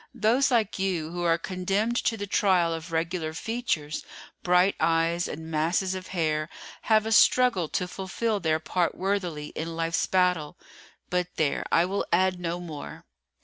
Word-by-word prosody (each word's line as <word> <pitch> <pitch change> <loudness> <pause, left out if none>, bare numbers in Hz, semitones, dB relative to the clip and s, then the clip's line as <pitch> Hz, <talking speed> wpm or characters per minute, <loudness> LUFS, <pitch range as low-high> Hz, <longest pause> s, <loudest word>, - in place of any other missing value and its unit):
"Those 240 +6 +3
like 225 -6 +1
you 175 -5 -1
who 175 0 -4
are 165 -1 +3
condemned 195 +6 -1
to 225 - +1
the 205 - -4
trial 185 -4 +2
of 165 +2 -6
regular 165 0 -2
features, 160 -9 -2 0.4
bright 180 +2 +4
eyes, 165 +1 +1
and 160 +2 -7
masses 170 +5 +1
of 185 0 -6
hair, 155 -3 -1 0.4
have 215 -1 +4
a 225 - -2
struggle 225 -7 +4
to 180 - -1
fulfil 200 +4 -2
their 160 -3 +1
part 175 +2 -1
worthily 180 -6 -2
in 165 +1 -4
life's 165 0 0
battle. 180 -4 +1 0.5
But 180 -1 +1
there, 150 -3 0
I 165 - +4
will 195 +2 -2
add 185 +1 +2
no 175 0 -3
more." 155 -5 -8
180 Hz, 160 wpm, -27 LUFS, 165-195 Hz, 0.5 s, bright